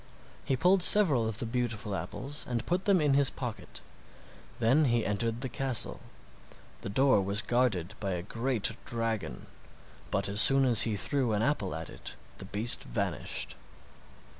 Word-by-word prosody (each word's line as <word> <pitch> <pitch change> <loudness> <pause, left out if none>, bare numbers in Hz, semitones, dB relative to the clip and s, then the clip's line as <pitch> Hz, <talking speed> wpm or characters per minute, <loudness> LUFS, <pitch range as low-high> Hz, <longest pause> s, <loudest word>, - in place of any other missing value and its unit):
He 135 - 0
pulled 180 +4 +3
several 155 - +5
of 110 -2 -4
the 120 - -2
beautiful 115 -3 -3
apples 130 - -5
and 120 -1 -2
put 180 +2 -1
them 195 -3 +4
in 145 -3 +2
his 140 -2 +3
pocket; 120 -4 -7 0.8
then 130 +6 +3
he 120 -3 +1
entered 115 +3 -2
the 135 - -2
castle. 130 -1 -2 0.8
The - - -5
door 130 0 +3
was 100 +2 0
guarded 120 -8 0
by 100 -3 -2
a 85 -1 -4
great 115 +1 -1
dragon, 115 - -3 0.6
but 100 +1 -1
as 100 +2 +4
soon 135 +2 +5
as 120 -4 +5
he 105 - -1
threw 125 +3 -1
an 105 +1 0
apple 105 - -1
at 80 0 -6
it - - -9 0.2
the - - -8
beast 110 +4 +2
vanished. - - -2
115 Hz, 165 wpm, -29 LUFS, 105-135 Hz, 0.8 s, several